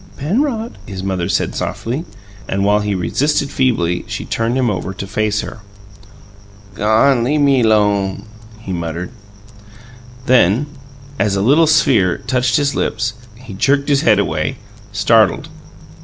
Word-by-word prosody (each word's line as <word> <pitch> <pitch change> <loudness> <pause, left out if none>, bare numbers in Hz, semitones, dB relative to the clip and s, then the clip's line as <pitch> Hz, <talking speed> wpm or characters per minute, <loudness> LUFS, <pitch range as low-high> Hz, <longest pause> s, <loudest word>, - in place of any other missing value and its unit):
"Penrod," 230 - -2
his 95 -3 -6
mother 95 -2 -2
said 95 - 0
softly, 130 +9 -4 0.4
and, 100 +1 -1
while 105 +1 +3
he 105 -1 -2
resisted 140 - 0
feebly, 90 -11 0
she - - -5
turned 115 +3 -1
him 130 -2 +1
over 95 -2 -3
to 100 - -6
face 105 +2 -1
her. - - -8 1.1
"Gawn 115 +5 +3
lea' 145 +5 +1
me 140 -3 +3
'lone," 105 -3 +1 0.4
he 100 -4 -6
muttered. 85 +1 -4 1.1
Then, 120 +1 +3 0.5
as 100 -2 +1
a 100 - 0
little 150 +8 +4
sphere 130 - +3
touched 125 -1 0
his 140 -1 0
lips, 115 +1 -1 0.2
he 120 -2 -11
jerked 140 +8 +1
his 140 -1 +3
head 110 -3 +4
away, 80 - -1 0.4
startled. 105 +2 +2
110 Hz, 140 wpm, -17 LUFS, 95-135 Hz, 1.1 s, little